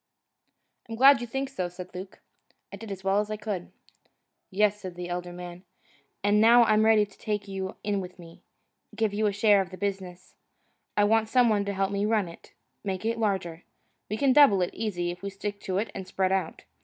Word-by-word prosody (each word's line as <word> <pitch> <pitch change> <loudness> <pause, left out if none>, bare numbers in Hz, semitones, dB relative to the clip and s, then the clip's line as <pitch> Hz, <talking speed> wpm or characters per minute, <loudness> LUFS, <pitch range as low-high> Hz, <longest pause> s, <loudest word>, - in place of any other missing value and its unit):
"I'm 225 - -4
glad 270 +2 +6
you 240 - -4
think 270 +4 -3
so," 185 -10 -4
said 180 +1 -10
Luke. 185 +1 -9 0.5
"I - - -6
did 220 0 -9
as 190 -1 -7
well 195 +1 +2
as 210 0 -2
I 215 - -3
could." 205 -4 -5 0.8
"Yes," 210 +1 +1
said 185 -2 -7
the 175 0 -6
elder 175 0 -4
man, 175 0 -9 0.6
"and 205 +1 +3
now 235 +2 +7
I'm 215 -2 +3
about 220 - +4
ready 215 -2 +5
to 200 - -21
take 210 -1 -3
you 190 -1 -5
in 205 -1 -1
with 180 0 -9
me, 170 -2 -14 0.5
give 220 -2 0
you 215 +1 +1
a - - +1
share 205 0 +4
in 190 - -5
the 185 - -10
business. 190 -3 -5 0.6
I 205 - +5
want 220 +1 +2
some 245 0 +4
one 205 -2 +1
to 200 - -2
help 195 0 -1
me 200 +1 0
run 215 -4 +1
it, 170 - -14 0.3
make 195 0 -4
it 230 0 -1
larger. 185 -6 -2 0.5
We 215 - -2
can 275 0 +3
double 235 -10 +6
it, 175 - -3
easy, 180 -6 -2
if 180 +1 -10
we 200 - -4
stick 200 +1 -5
to 185 -1 -3
it 205 +1 -2
and 190 -1 -7
spread 190 0 0
out. 190 -4 -2
200 Hz, 220 wpm, -27 LUFS, 185-215 Hz, 0.8 s, now